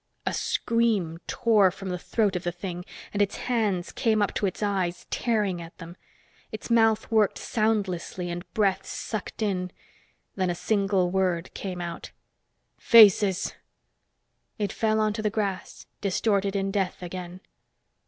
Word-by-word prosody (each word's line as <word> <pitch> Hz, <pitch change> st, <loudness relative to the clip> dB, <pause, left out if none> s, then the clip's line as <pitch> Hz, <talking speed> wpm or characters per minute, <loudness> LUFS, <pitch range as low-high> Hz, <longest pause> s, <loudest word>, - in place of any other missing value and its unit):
A -, -, 0 dB
scream 215 Hz, -8 st, 0 dB
tore 215 Hz, -5 st, +4 dB
from 190 Hz, +2 st, -7 dB
the 180 Hz, -1 st, -3 dB
throat 205 Hz, 0 st, 0 dB
of 180 Hz, -, -1 dB
the 175 Hz, -, -1 dB
thing, 180 Hz, 0 st, -6 dB, 0.3 s
and 205 Hz, -, 0 dB
its 200 Hz, -, +1 dB
hands 210 Hz, -8 st, -1 dB
came 220 Hz, -2 st, +1 dB
up 205 Hz, -, +1 dB
to 200 Hz, -, 0 dB
its 190 Hz, -, -4 dB
eyes, 190 Hz, -4 st, -1 dB
tearing 210 Hz, -7 st, 0 dB
at 165 Hz, +1 st, -11 dB
them. 170 Hz, 0 st, -10 dB, 0.6 s
Its 215 Hz, +2 st, -7 dB
mouth 225 Hz, -1 st, +3 dB
worked 215 Hz, -3 st, +3 dB
soundlessly, 195 Hz, -5 st, -1 dB
and 175 Hz, 0 st, -7 dB
breath 195 Hz, -3 st, +2 dB
sucked 215 Hz, 0 st, -5 dB
in. 185 Hz, -3 st, -1 dB, 0.7 s
Then 185 Hz, -2 st, 0 dB
a 175 Hz, -, -1 dB
single 190 Hz, -1 st, +1 dB
word 185 Hz, -2 st, 0 dB
came 185 Hz, -2 st, -5 dB
out. 170 Hz, -1 st, -6 dB, 0.7 s
"Faces!" 205 Hz, -3 st, +6 dB, 1.0 s
It 205 Hz, -2 st, -2 dB
fell 220 Hz, -1 st, +1 dB
onto 215 Hz, 0 st, 0 dB
the 215 Hz, -, +1 dB
grass, 200 Hz, -3 st, -3 dB, 0.2 s
distorted 200 Hz, 0 st, +1 dB
in 195 Hz, 0 st, 0 dB
death 190 Hz, -2 st, -2 dB
again. 180 Hz, 0 st, -7 dB
195 Hz, 145 wpm, -26 LUFS, 180-215 Hz, 1.0 s, Faces